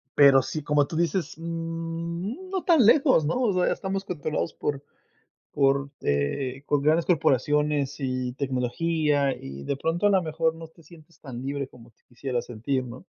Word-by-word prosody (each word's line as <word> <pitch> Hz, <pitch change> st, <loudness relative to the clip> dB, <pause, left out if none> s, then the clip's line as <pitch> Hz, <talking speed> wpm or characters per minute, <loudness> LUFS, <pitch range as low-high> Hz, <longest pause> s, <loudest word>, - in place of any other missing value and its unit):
pero 140 Hz, -2 st, +7 dB
sí, 140 Hz, +4 st, -5 dB
como 145 Hz, -1 st, +2 dB
tú -, -, -6 dB
dices, 170 Hz, 0 st, 0 dB
mm, 165 Hz, -, -5 dB
no 375 Hz, -1 st, -2 dB
tan 320 Hz, -, +5 dB
lejos, 260 Hz, -, +5 dB
¿no?, 155 Hz, -, 0 dB
o 225 Hz, -6 st, +2 dB
sea, 180 Hz, -1 st, +2 dB
estamos 195 Hz, 0 st, -4 dB
controlados 155 Hz, -3 st, -3 dB
por 140 Hz, -2 st, -3 dB, 0.7 s
por, 140 Hz, 0 st, +2 dB
eh, 125 Hz, -, -1 dB
con 145 Hz, -1 st, +2 dB
grandes 160 Hz, +3 st, +3 dB
corporaciones 145 Hz, -2 st, +2 dB
y 130 Hz, -2 st, -2 dB
tecnología, 140 Hz, +2 st, 0 dB
y 70 Hz, +1 st, -9 dB
de 140 Hz, -, -2 dB
pronto, 165 Hz, +7 st, 0 dB
a -, -, +5 dB
la 195 Hz, -2 st, +4 dB
mejor 160 Hz, 0 st, 0 dB
no 165 Hz, 0 st, -10 dB
te 165 Hz, +1 st, -21 dB
sientes 160 Hz, 0 st, -18 dB
tan 130 Hz, -4 st, -7 dB
libre 140 Hz, 0 st, -3 dB
como 120 Hz, -2 st, -16 dB
te 115 Hz, -, -40 dB
quisieras 125 Hz, 0 st, -4 dB
sentir, 130 Hz, +3 st, -2 dB
¿no? 125 Hz, +1 st, -10 dB
150 Hz, 175 wpm, -26 LUFS, 135-170 Hz, 0.7 s, pero